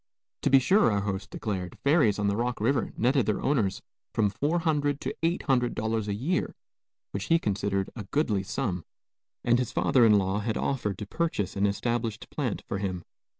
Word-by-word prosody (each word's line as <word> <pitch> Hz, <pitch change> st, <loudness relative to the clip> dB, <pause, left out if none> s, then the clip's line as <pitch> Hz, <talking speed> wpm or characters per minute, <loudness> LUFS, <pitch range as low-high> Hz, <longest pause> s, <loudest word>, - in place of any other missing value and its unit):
To -, -, +2 dB
be 135 Hz, -, +7 dB
sure, 185 Hz, -, +4 dB
our 100 Hz, -1 st, +1 dB
host 100 Hz, -1 st, -3 dB
declared, 95 Hz, -5 st, -4 dB
ferries 140 Hz, -8 st, +4 dB
on 105 Hz, -, -1 dB
the 100 Hz, 0 st, +2 dB
Rock 120 Hz, +1 st, -1 dB
River 120 Hz, +3 st, +1 dB
netted 130 Hz, +2 st, +2 dB
their 105 Hz, -, +1 dB
owners 110 Hz, -9 st, 0 dB, 0.3 s
from 105 Hz, -3 st, +2 dB
$400 145 Hz, -, 0 dB
to -, -, -3 dB
$800 120 Hz, -, 0 dB
a 100 Hz, -, -1 dB
year, 155 Hz, -, -1 dB, 0.6 s
which 100 Hz, 0 st, -3 dB
he 165 Hz, -, +4 dB
considered 100 Hz, -, -1 dB
a 110 Hz, -5 st, -6 dB
goodly 105 Hz, -4 st, 0 dB
sum, 100 Hz, -4 st, -3 dB, 0.6 s
and 120 Hz, 0 st, +3 dB
his 125 Hz, -, -1 dB
father 125 Hz, -, +3 dB
in 105 Hz, -2 st, +6 dB
law 95 Hz, +1 st, 0 dB
had 110 Hz, +1 st, -2 dB
offered 105 Hz, -8 st, -1 dB
to 105 Hz, -, -5 dB
purchase 105 Hz, -, -2 dB
an 100 Hz, +1 st, +2 dB
established 115 Hz, +1 st, -2 dB
plant -, -, -2 dB
for 100 Hz, -, -2 dB
him. 95 Hz, -3 st, -3 dB
110 Hz, 180 wpm, -28 LUFS, 100-135 Hz, 0.6 s, be